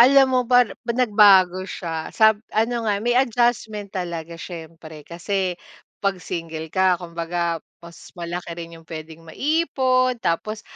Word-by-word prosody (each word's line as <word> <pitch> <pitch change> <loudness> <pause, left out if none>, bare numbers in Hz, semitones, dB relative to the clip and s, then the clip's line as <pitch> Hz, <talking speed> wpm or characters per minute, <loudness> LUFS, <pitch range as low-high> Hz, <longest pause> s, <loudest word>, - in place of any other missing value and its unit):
Alam 270 +2 +7
mo 255 - +4
ba 250 0 +7 0.3
nagbago 205 -6 +5
siya 165 -2 -5
sab 220 -1 +5 0.2
ano 230 +1 +1
nga, 205 0 0
may 240 - +2
adjustment 235 -5 0
talaga 170 -2 -5
siyempre 160 -2 -9
kasi 180 +2 -2 0.4
'pag 195 -1 0
single 160 -2 -5
ka 185 -1 +3
kumbaga 170 0 -3 0.3
mas 170 0 -13
malaki 175 0 -5
rin 165 -1 -8
yung 165 - -22
pwedeng 160 0 -8
maipon, 260 - +1
tapos 215 +6 -2
185 Hz, 135 wpm, -22 LUFS, 170-230 Hz, 0.4 s, Alam